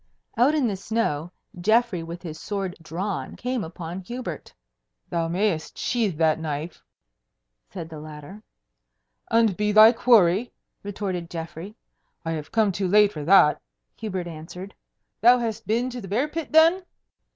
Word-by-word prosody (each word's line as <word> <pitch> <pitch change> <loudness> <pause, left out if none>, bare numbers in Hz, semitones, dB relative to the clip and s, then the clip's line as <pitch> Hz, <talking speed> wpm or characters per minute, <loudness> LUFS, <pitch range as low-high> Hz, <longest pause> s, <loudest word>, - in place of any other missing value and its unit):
Out 265 +6 +4
in 295 -4 +2
the 205 - -1
snow, 185 -6 -2 0.3
Geoffrey 220 -1 +2
with 170 +2 -8
his 160 -3 -7
sword 195 -3 -4
drawn 180 +5 -4
came 250 -2 -3
upon 165 +2 -7
Hubert. 190 - -7 0.6
"Thou 165 -1 0
mayest 175 -1 -1
sheathe 220 -9 -1
that 160 -1 +2
knife," 155 +1 -5 0.9
said 170 -4 -7
the 160 -2 -8
latter. 155 +6 -10 0.9
"And 225 -4 +3
be 210 +2 0
thy 215 +2 +9
quarry?" 225 -3 +4 0.3
retorted 190 -4 -4
Geoffrey. 165 +4 -7 0.5
"I 165 - -1
have 155 -2 -5
come 220 -3 +2
too 190 +1 -2
late 205 +2 +5
for 150 - -5
that!" 170 -4 +5 0.3
Hubert 190 -5 -4
answered. 175 +4 -9 0.5
"Thou 240 +3 +7
hast 225 -2 -4
been 240 +4 0
to 245 0 -6
the 195 - -8
bear 235 +10 0
pit, 320 +1 -5
then?" 325 +4 +5
195 Hz, 150 wpm, -24 LUFS, 165-225 Hz, 0.9 s, thy